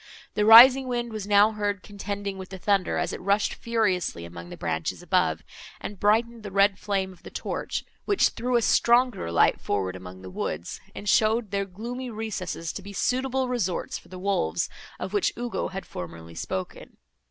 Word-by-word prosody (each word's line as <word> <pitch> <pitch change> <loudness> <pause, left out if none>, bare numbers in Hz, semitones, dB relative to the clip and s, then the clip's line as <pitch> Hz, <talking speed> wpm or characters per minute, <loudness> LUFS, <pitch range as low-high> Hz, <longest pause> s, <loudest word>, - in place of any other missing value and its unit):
The 210 - +1
rising 255 +4 +10
wind 240 -2 -2
was 210 -2 -5
now 205 +1 +5
heard 205 -2 -2
contending 200 -1 -5
with 190 - -8
the 190 - -7
thunder, 195 0 +1
as - - -1
it - - -6
rushed 200 +2 +1
furiously 200 - -1
among 85 0 -9
the - - -9
branches - - -3
above, - - +1 0.4
and 200 -2 -7
brightened 230 +3 +2
the 210 - -7
red 195 0 +3
flame 195 -2 -1
of 180 - -20
the - - -10
torch, - - -4 0.2
which 405 -2 +3
threw 245 +2 -2
a 235 - +3
stronger 240 - +3
light 85 - +3
forward 95 -2 -1
among 95 0 -10
the 95 - -8
woods, 85 -1 -4
and 205 - -7
showed 220 +1 +3
their 200 0 0
gloomy 240 +7 -6
recesses 205 -7 -4
to - - -6
be 200 +1 -10
suitable 260 +4 0
resorts 230 -8 -2
for - - -21
the 185 +1 -9
wolves, 180 - 0 0.3
of 190 - -5
which 205 - +1
Ugo 240 -1 -2
had 190 -1 -6
formerly 85 -1 -8
spoken. 95 +2 -6
200 Hz, 185 wpm, -26 LUFS, 180-230 Hz, 0.4 s, rising